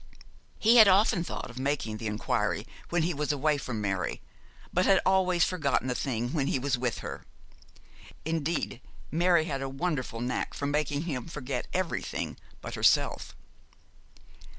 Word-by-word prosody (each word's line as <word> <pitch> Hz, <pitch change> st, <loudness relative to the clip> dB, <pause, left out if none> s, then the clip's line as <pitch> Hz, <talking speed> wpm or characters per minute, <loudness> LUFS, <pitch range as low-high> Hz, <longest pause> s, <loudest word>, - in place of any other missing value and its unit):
He 230 Hz, +2 st, +5 dB
had 220 Hz, -3 st, +10 dB
often 195 Hz, -1 st, +4 dB
thought 130 Hz, -, -6 dB
of 125 Hz, -, -9 dB
making 130 Hz, -6 st, -1 dB
the 110 Hz, -, -4 dB
inquiry 105 Hz, 0 st, -1 dB, 0.2 s
when 170 Hz, -1 st, +1 dB
he 175 Hz, +2 st, 0 dB
was 150 Hz, +1 st, -1 dB
away 145 Hz, +1 st, +1 dB
from 120 Hz, -5 st, -4 dB
Mary, 95 Hz, -3 st, -1 dB, 0.5 s
but 180 Hz, +1 st, +2 dB
had 195 Hz, -1 st, +6 dB
always 185 Hz, -2 st, +3 dB
forgotten 150 Hz, -7 st, +1 dB
the 125 Hz, -, +1 dB
thing 120 Hz, -1 st, -2 dB
when 140 Hz, -4 st, 0 dB
he -, -, +1 dB
was 135 Hz, +1 st, 0 dB
with 120 Hz, -2 st, -2 dB
her. -, -, -6 dB, 1.0 s
Indeed, 160 Hz, -5 st, -1 dB, 0.3 s
Mary 170 Hz, 0 st, +3 dB
had 140 Hz, -4 st, -3 dB
a 135 Hz, -, -3 dB
wonderful 135 Hz, -5 st, -2 dB
knack 125 Hz, +1 st, -3 dB
of 140 Hz, -, -1 dB
making 145 Hz, 0 st, 0 dB
him 140 Hz, -7 st, -4 dB
forget 140 Hz, -5 st, -4 dB
everything 185 Hz, -2 st, -2 dB, 0.2 s
but -, -, -6 dB
herself. -, -, +2 dB
145 Hz, 155 wpm, -29 LUFS, 130-170 Hz, 1.0 s, had